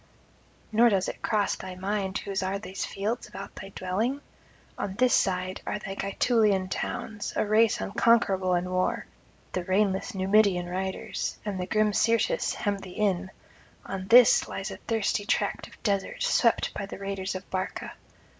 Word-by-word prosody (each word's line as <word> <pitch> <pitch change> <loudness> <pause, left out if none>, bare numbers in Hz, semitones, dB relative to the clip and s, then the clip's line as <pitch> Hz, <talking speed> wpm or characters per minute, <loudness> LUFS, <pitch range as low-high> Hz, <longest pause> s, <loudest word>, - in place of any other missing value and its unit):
nor 235 +2 +6
does 195 -3 +1
it - - -6
cross 210 -3 +1
thy 185 -1 -7
mind 195 +1 -2
whose 195 -1 -3
are 190 +1 -1
these 195 -2 -5
fields 210 +4 -3
about - - -8
thy 195 - -9
dwelling? 215 +9 -1 0.6
On 190 - -4
this 250 +3 +3
side 185 0 +1
are - - -2
the 195 -2 -6
Gaetulian 200 -1 +2
towns, 210 +2 -4
a - - +1
race 215 +1 +3
unconquerable 195 -4 +2
in 175 +1 -1
war; 185 0 0 0.5
the 180 - -2
reinless 190 +4 +1
Numidian 190 -1 +3
riders 190 +1 -3
and 200 -3 -3
the 180 - -3
grim 215 -1 +2
Syrtis 230 - +2
hem 200 -1 -1
thee 185 -2 -10
in; 195 -3 +1 0.6
on 190 -1 -5
this 240 +1 +7
lies 195 - -5
a - - -7
thirsty 220 -2 0
tract - - -1
of - - -18
desert, 200 - -1
swept - - +2
by 200 - -4
the - - -7
raiders 195 -1 -4
of 185 0 -6
Barca. 185 0 -3
195 Hz, 165 wpm, -27 LUFS, 190-215 Hz, 0.6 s, this